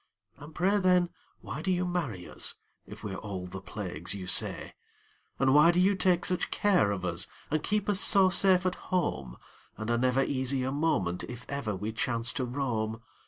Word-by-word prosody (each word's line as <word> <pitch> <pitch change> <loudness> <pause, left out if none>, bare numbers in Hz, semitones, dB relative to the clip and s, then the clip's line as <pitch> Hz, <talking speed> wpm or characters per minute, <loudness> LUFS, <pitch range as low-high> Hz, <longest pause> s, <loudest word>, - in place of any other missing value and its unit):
And 150 +2 -12
pray, 195 +4 +2
then, 180 -2 +3 0.3
why 120 +10 -6
do 185 - -2
you 180 0 +1
marry 145 - -3
us, - - 0 0.3
If - - -11
we're 105 - -4
all 95 -3 -6
the 90 +1 -7
plagues 90 -3 -3
you 95 -2 -6
say? - - 0 0.6
And 135 0 +3
why 150 +3 +7
do 175 +1 +3
you 190 +2 +4
take 185 -1 +2
such 180 - 0
care 190 - +3
of 100 -2 -3
us, 85 +3 -1 0.2
And 155 0 +1
keep 210 -1 -1
us 205 -2 +1
so 195 -2 +5
safe 185 -1 +3
at 185 0 -3
home, 70 - -1 0.4
And 110 +2 -3
are 120 - +2
never 130 +2 +2
easy 130 -1 0
a 130 - -1
moment 135 - 0
If 125 0 -9
ever 140 -7 -3
we 105 +4 -4
chance 115 +1 -1
to 130 - -2
roam? 115 -4 -2
130 Hz, 195 wpm, -29 LUFS, -, 0.6 s, why